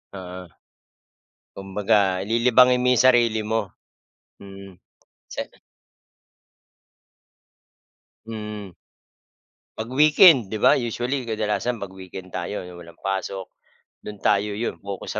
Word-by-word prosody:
Oo. 90 -1 -9 1.1
Kumbaga 95 -1 +1
lilibangin 125 +2 +4
mo - - +1
yung 125 - +2
sarili 120 -3 +4
mo. 110 -2 -2 0.7
Mm, 100 -1 -12 0.5
sana. - - -7 2.7
Mm. 105 -3 -7 1.1
'Pag-weekend 135 - +5
'di 110 - -3
ba, - - +5
usually 120 +2 -2
kadalasan 110 +1 -2
'pag-weekend 95 -2 -10
tayo 90 +2 -4
'yong 90 -1 -11
walang 85 -1 -14
pasok, 95 0 -4 0.5
do'n 105 -1 -10
tayo, 100 +1 +1
'yon 115 +3 -4
pokus 100 -1 -6
105 Hz, 95 wpm, -23 LUFS, 95-120 Hz, 2.7 s, Pag-weekend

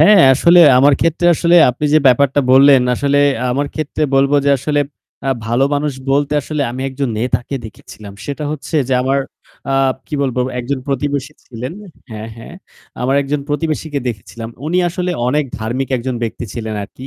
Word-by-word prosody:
হ্যাঁ, 205 -3 +7
আসলে 170 +5 +5 0.2
আমার 140 +2 +5
ক্ষেত্রে 165 +1 +1
আসলে 170 +2 +3
আপনি 140 +5 -6
যে - - +7
ব্যাপারটা 135 +2 +4
বললেন, 135 -1 +6
আসলে 140 +2 +1 0.3
আমার 140 +3 -1
ক্ষেত্রে 155 0 -3
বলব 135 +1 +3
যে 140 - +3
আসলে 145 +2 0 0.5
আ - - +2 0.2
ভালো 120 +4 +2
মানুষ 145 0 -1 0.2
বলতে 145 +1 +1
আসলে 150 -1 -3
আমি 130 +2 -6
একজন 135 0 -3
নেতাকে 125 +3 -2
দেখেছিলাম। 105 -1 -12
সেটা 145 +1 -5
হচ্ছে 155 +2 -4
যে 130 - +1
আমার 135 +1 +1 0.5
আ - - +1 0.3
কি 155 - -6
বলবো 130 -2 -1 0.2
একজন 130 +2 -3
প্রতিবেশী 140 +1 -2
ছিলেন, 125 +4 -7 0.4
হ্যাঁ, 110 0 -7
হ্যাঁ। 115 +8 -11 0.5
আমার 130 +2 +1
একজন 140 +1 -2
প্রতিবেশীকে 155 -1 -2
দেখেছিলাম। 115 +1 -7 0.2
উনি 175 +3 0
আসলে 180 +1 -3 0.2
অনেক 150 +3 +1
ধার্মিক 120 +4 -3
একজন 125 +1 -4
ব্যক্তি 115 +1 -4
ছিলেন 110 -2 -5
আরকি। 130 +5 -12
140 Hz, 170 wpm, -16 LUFS, 125-150 Hz, 0.5 s, হ্যাঁ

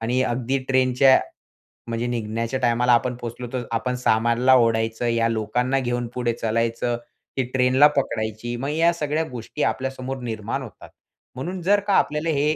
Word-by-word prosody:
आणि 120 +3 0
अगदी 130 +2 -1
ट्रेनच्या 130 0 +5 0.7
म्हणजे 115 +1 -2
निघण्याच्या 115 +2 -2
टायमाला 120 0 +2
आपण 125 +1 +2
पोहचलो, 120 +1 -6
तर 125 - -2
आपण 125 +2 -1
सामानला 120 +3 +3
ओढायचं, 115 -1 +1
या 115 -1 +2
लोकांना 120 +4 0
घेऊन 120 -1 -2
पुढे 120 -2 -1
चलायचं 115 +1 -1 0.4
की 130 - +2
ट्रेनला 130 +3 +5
पकडायची. 110 -2 -2
मग 135 +4 -3
या 165 +3 +3
सगळ्या 155 0 -1
गोष्टी 125 +5 -5
आपल्यासमोर 135 0 -2
निर्माण 110 -3 -3
होतात. - - -12 0.5
म्हणून 175 +7 -5
जर 200 +4 +3
का 200 - +2
आपल्याला 150 +2 0
हे 150 +2 +2
125 Hz, 155 wpm, -23 LUFS, 115-135 Hz, 0.7 s, ट्रेनच्या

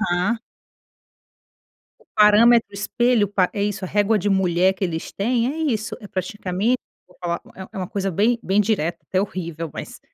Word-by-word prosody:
aham. 205 +6 0 1.6
O - - -24
parâmetro 215 +1 +6
espelho, 230 +1 +1
pa 185 -2 +1
é 200 - -2
isso, 200 -2 -2
a - - -4
régua 205 +2 +2
de 205 +1 -1
mulher 190 -1 +3
que 195 - -3
eles 165 -3 -4
têm, 235 +3 0
é - - -7 0.2
isso, 215 0 -3
é 205 - -10
praticamente 195 +5 -1 0.3
vou 180 - -23
falar, 170 -1 -2 0.2
é 190 - -7
é - - -11
uma 185 -2 -3
coisa 195 -1 -2
bem 220 +7 +2
bem 195 +3 +2
direta, 175 -6 0
até 185 - +1
horrível, 170 -5 -4
mas - - -8
200 Hz, 180 wpm, -22 LUFS, 185-215 Hz, 1.6 s, parâmetro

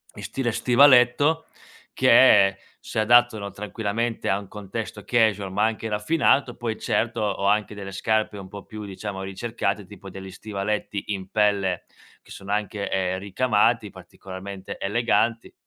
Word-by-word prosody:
in - - -9
stile 130 -3 -2
stivaletto, 130 +5 +4 0.5
che 95 -1 +6 0.2
si - - -4
adattano 110 -2 +4
tranquillamente 110 +3 -3
a 95 - +1
un 100 - -11
contesto 105 +1 -6
casual 105 -5 +1
ma 105 +2 +1
anche 110 0 -1
raffinato, 125 +3 +1
poi 115 -2 -3
certo, 115 0 -1
ho 100 -2 -1
anche 105 +1 +1
delle 100 -1 -7
scarpe 110 +1 0
un 95 -1 -9
po' 100 0 -10
più, 110 -1 -8
diciamo, 100 0 -6
ricercate 105 +1 -3
tipo 100 0 -12
degli 95 0 -9
stivaletti 105 +1 -4
in 95 -1 -6
pelle 100 -4 +1 0.4
che - - -19
sono 100 0 -8
anche, 105 -1 -2
ehm, 95 -1 -1
ricamati 105 +2 +1
particolarmente 95 +1 -9
eleganti 115 +2 0
105 Hz, 140 wpm, -24 LUFS, 100-115 Hz, 0.5 s, che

